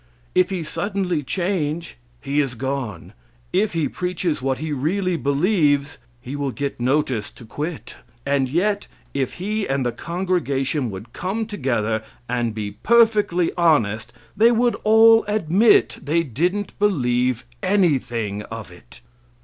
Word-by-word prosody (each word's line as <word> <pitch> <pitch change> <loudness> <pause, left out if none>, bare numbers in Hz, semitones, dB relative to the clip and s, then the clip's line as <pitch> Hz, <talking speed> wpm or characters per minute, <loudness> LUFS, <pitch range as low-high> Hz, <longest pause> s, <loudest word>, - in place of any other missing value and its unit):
If 185 0 +3
he 185 -4 -2
suddenly 185 0 -1
change, 170 0 -2 0.3
he 140 +1 -1
is 135 -4 0
gone. 130 -7 -4 0.4
If 200 +2 +2
he 165 -3 +1
preaches 180 -4 -2
what 135 0 0
he 155 0 -4
really 180 +7 0
believes, 145 - +1 0.2
he 130 +3 -7
will 145 -1 -1
get 140 +1 -4
notice 125 -4 0
to 120 - -14
quit. 150 +8 -5 0.3
And 140 -2 +1
yet 200 +7 0 0.3
if 135 -2 -1
he 210 +3 -2
and 135 -1 0
the 120 - +1
congregation 155 -6 -1
would 105 +4 -9
come 200 +5 -2
together 120 - -1 0.3
and 120 -2 -1
be 105 -2 -4
perfectly 210 - +3
honest, 120 - +2 0.2
they 230 +3 +5
would 240 +1 +2
all 225 +1 +7
admit 210 +1 +3
they 165 +3 +1
didn't 180 - -1
believe 125 - +1 0.2
anything 130 - +1
of 110 -4 -7
it. 90 -8 -16
150 Hz, 135 wpm, -22 LUFS, 125-185 Hz, 0.4 s, all